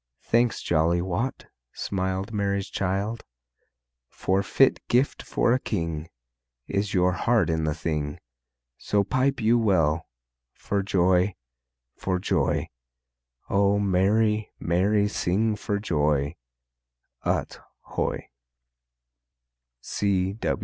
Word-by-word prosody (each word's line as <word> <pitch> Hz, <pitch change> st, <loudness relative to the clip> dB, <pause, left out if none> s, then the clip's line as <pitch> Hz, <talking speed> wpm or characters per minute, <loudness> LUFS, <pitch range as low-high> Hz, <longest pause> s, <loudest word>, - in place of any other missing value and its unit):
Thanks, 120 Hz, 0 st, +1 dB
jolly 85 Hz, +1 st, +2 dB
Wat, 95 Hz, +9 st, -2 dB, 0.3 s
smiled 95 Hz, +2 st, -2 dB
Mary's 100 Hz, -1 st, -1 dB
child, 100 Hz, +4 st, -2 dB, 0.9 s
For 95 Hz, +1 st, 0 dB
fit 115 Hz, +6 st, +3 dB
gift 125 Hz, +4 st, +2 dB
for 120 Hz, -, +1 dB
a 130 Hz, -, +2 dB
king 85 Hz, -8 st, -3 dB, 0.6 s
Is 100 Hz, 0 st, -1 dB
your 90 Hz, 0 st, +4 dB
heart 100 Hz, -1 st, +2 dB
in 80 Hz, -1 st, 0 dB
the 75 Hz, -1 st, 0 dB
thing. 75 Hz, -3 st, -3 dB, 0.6 s
So 100 Hz, -1 st, +1 dB
pipe 130 Hz, +5 st, +1 dB
you 115 Hz, +1 st, +3 dB
well, 80 Hz, -7 st, +2 dB, 0.5 s
For 100 Hz, -1 st, -2 dB
joy, 95 Hz, 0 st, +2 dB, 0.6 s
for 95 Hz, -1 st, -1 dB
joy! 90 Hz, -, 0 dB, 0.8 s
O 100 Hz, 0 st, +3 dB
merry, 105 Hz, +2 st, +2 dB
merry 100 Hz, +4 st, +2 dB
sing 105 Hz, +2 st, 0 dB
for 105 Hz, 0 st, -2 dB
joy, 75 Hz, -7 st, 0 dB, 0.9 s
Ut -, -, -1 dB, 0.2 s
hoy! -, -, -3 dB
100 Hz, 100 wpm, -26 LUFS, 85-105 Hz, 0.9 s, your